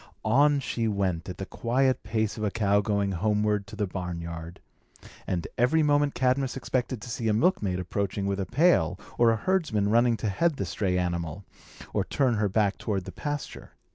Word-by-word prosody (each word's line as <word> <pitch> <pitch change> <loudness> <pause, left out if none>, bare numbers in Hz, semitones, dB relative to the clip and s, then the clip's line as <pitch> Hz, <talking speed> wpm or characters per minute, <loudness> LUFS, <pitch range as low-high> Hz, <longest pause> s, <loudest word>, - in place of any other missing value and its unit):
On 140 +6 +4
she 115 -4 -2
went 95 -5 -1
at 90 - -6
the 95 - -4
quiet 130 +5 0
pace 110 -1 -1
of 110 - -5
a 105 - +2
cow 100 -1 +2
going 100 -1 0
homeward 105 +2 0
to 100 - -9
the 105 -1 0
barnyard; 85 -3 -6 0.7
and, 85 -3 -2
every 155 +7 +4
moment 145 -1 +2
Cadmus 130 +1 +1
expected 130 -2 -2
to - - -8
see 120 -3 -2
a 110 - +3
milkmaid 105 - +1
approaching 100 +2 -2
with 100 0 -1
a 95 - -2
pail, 120 - +3 0.2
or 120 -1 +6
a 115 - +3
herdsman 130 - 0
running 120 0 +4
to 110 - -3
head 165 - +1
the 100 - -3
stray 90 +1 -1
animal, 85 0 -2 0.5
and - - -1
turn 130 -3 +2
her 105 -1 +1
back 100 0 +1
toward 100 -4 -2
the - - -7
pasture. 145 -1 -6
105 Hz, 190 wpm, -27 LUFS, 95-125 Hz, 0.7 s, or